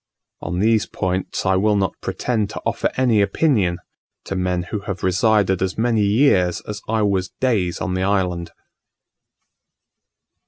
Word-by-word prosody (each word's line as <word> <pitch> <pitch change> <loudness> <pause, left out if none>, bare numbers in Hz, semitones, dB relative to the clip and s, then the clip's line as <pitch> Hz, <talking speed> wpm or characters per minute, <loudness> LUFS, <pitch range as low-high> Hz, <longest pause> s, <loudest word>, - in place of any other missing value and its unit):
On 90 - -4
these 110 +3 +2
points 95 0 -3
I 95 - +3
will 105 +2 +2
not 100 -1 0
pretend 110 -5 -1
to - - -7
offer - - 0
any 120 -5 +3
opinion 100 - +1 0.5
to 95 - -5
men 90 -1 -1
who 105 - -1
have 100 -1 -6
resided 95 0 +2
as 95 0 -1
many 115 -1 +1
years 100 -4 +3
as 105 0 -7
I 110 0 +1
was 95 -2 0
days 105 -9 0
on 90 - -2
the 95 - -1
island. 90 -3 0
100 Hz, 150 wpm, -21 LUFS, 90-110 Hz, 0.5 s, I